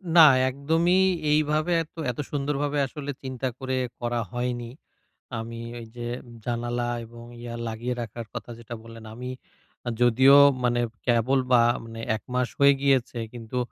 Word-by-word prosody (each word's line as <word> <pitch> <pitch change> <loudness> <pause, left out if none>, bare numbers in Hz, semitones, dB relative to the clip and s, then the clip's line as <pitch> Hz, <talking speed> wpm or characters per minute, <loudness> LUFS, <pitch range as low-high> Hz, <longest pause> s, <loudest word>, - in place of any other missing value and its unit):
না 170 - +10 0.3
একদমই 165 +7 +2 0.3
এইভাবে 155 +2 +2
এত 160 - -21 0.2
এত 120 - -12
সুন্দরভাবে 145 0 -1
আসলে 145 +1 -5
চিন্তা 130 0 -3
করে 130 -1 -2 0.2
করা 120 0 -1
হয়নি। 120 -1 -3 0.7
আমি 115 +1 -6 0.2
ওই 115 - -8
যে, 120 0 -5 0.4
জানালা 120 0 -2 0.2
এবং 115 +1 -12 0.2
ইয়া 120 0 -6
লাগিয়ে 120 +3 -3
রাখার 115 0 -6
কথা - - -6
যেটা 120 0 -8
বললেন 115 0 -11
আমি 125 +2 -6 0.7
যদিও 130 +3 +7 0.3
মানে 120 0 +2 0.3
কেবল 120 +3 +3
বা 120 -1 +7 0.2
মানে 115 0 -8 0.2
একমাস 125 +1 -2
হয়ে 140 0 +7
গিয়েছে 135 -3 +2
কিন্তু 120 0 -5
125 Hz, 140 wpm, -26 LUFS, 120-140 Hz, 0.7 s, না